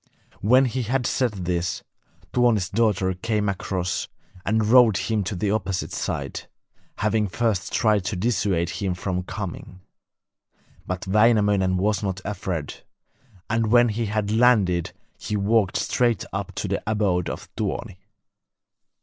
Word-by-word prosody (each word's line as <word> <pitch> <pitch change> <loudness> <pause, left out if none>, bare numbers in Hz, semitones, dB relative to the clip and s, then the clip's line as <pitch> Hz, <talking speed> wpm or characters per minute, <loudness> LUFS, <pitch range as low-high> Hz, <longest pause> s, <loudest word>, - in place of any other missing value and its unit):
When 130 +6 +5
he 130 +1 -2
had 125 +2 -1
said 105 -10 -1
this, 85 -1 -2 0.5
Tuoni's 115 -7 +2
daughter 100 -3 +1
came 105 +2 -1
across 95 -2 -2 0.4
and 110 +1 +1
rowed 115 -3 +6
him 110 -2 -1
to 100 - -3
the 100 +3 -1
opposite 95 -3 -2
side, - - -4 0.5
having 105 +1 +1
first 100 0 -1
tried 105 -3 +2
to 105 - -2
dissuade 90 -4 0
him 95 -3 -2
from 90 0 -2
coming. 90 -1 -7 1.1
But 95 0 -4
Wainamoinen 105 -2 +3
was 105 +3 +1
not 95 -2 -2
afraid; 95 -7 -4 0.6
and 115 -1 +1
when 120 +1 +5
he 110 +1 -2
had 105 0 -1
landed 105 -7 +3 0.3
he 105 - -2
walked 100 -1 +2
straight 120 -3 +1
up 100 0 -4
to - - -3
the 100 +1 -1
abode 100 -5 +1
of - - -6
Tuoni. 90 -2 -4
105 Hz, 135 wpm, -24 LUFS, 95-110 Hz, 1.1 s, rowed